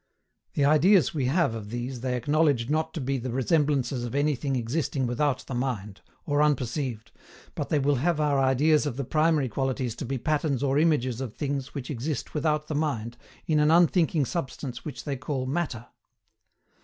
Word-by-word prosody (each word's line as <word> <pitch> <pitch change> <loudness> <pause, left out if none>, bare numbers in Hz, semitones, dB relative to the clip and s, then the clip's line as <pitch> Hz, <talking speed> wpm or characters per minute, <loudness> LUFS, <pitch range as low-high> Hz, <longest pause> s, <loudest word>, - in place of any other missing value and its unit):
The 140 - +3
ideas 160 +6 +5
we 140 -5 -1
have 150 -1 +2
of 110 -2 -6
these 120 +2 -4
they 125 -1 -1
acknowledge 145 -1 +1
not 160 +1 0
to - - -2
be 135 0 -1
the 130 +2 -4
resemblances 135 -1 +1
of 120 +2 -4
anything 145 -1 0
existing 130 +2 -1
without 130 +3 0
the - - -6
mind, 115 -6 -3 0.2
or 145 0 +1
unperceived, 130 -5 -1 0.4
but - - -4
they 150 - +2
will 140 0 +2
have 160 +4 +1
our 145 -2 +2
ideas 145 +4 +3
of 130 -3 -4
the 140 - -1
primary 155 0 +2
qualities 130 0 -2
to - - -4
be 135 +2 -2
patterns 145 0 0
or 140 +1 +2
images 135 -6 +1
of 125 -5 -5
things 140 -2 -3
which 140 0 -5
exist 135 +1 -4
without 150 0 0
the 155 - -3
mind, 135 -7 -2 0.3
in 155 -2 +2
an 150 0 +4
unthinking 165 -2 +4
substance 130 -5 -5
which 150 - -7
they 140 -3 -3
call 135 -1 -3
MATTER. 130 -5 -2
140 Hz, 180 wpm, -27 LUFS, 125-150 Hz, 0.4 s, ideas